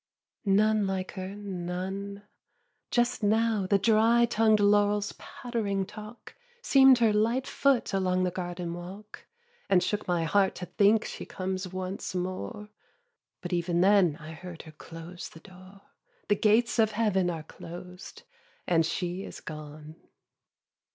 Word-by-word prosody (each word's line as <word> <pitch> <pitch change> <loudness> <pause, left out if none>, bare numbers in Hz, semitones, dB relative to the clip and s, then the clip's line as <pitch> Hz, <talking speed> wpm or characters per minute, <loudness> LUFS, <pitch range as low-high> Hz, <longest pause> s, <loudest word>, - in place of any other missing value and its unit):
2. 195 - +1
None 215 0 +3
like 190 -1 -3
her, 190 0 -6
none. 195 +1 -5 0.7
Just 240 0 +1
now 215 -1 +2
the 200 - +4
dry 225 +3 +4
tongued 225 -2 +3
laurels' 205 0 +3
pattering 210 -5 -3
talk 215 +4 -11 0.3
Seem'd 270 - +7
her 225 -3 +3
light 230 +5 +1
foot 275 -7 +1
along 185 -1 +1
the 180 - 0
garden 175 -1 -4
walk, 190 +5 -10 0.4
And 185 -2 +4
shook 210 -2 -2
my 175 -2 +1
heart 195 +4 +2
to 180 - -6
think 210 +3 +3
she - - -6
comes 185 -1 -4
once 185 0 -5
more; 185 +4 -4 0.7
But - - -5
even 175 0 +1
then 190 -5 +4
I 155 0 -9
heard 170 +1 -9
her 155 - -12
close 165 +3 -9
the 160 - -14
door, 185 +2 -15 0.5
The 205 - +5
gates 225 +4 +2
of 220 -1 +3
Heaven 205 -5 +1
are 165 -3 -4
closed, 180 - -10 0.4
and 165 -2 +3
she 175 +1 -3
is - - -9
gone. 155 0 -9
195 Hz, 145 wpm, -28 LUFS, 180-215 Hz, 0.7 s, Seem'd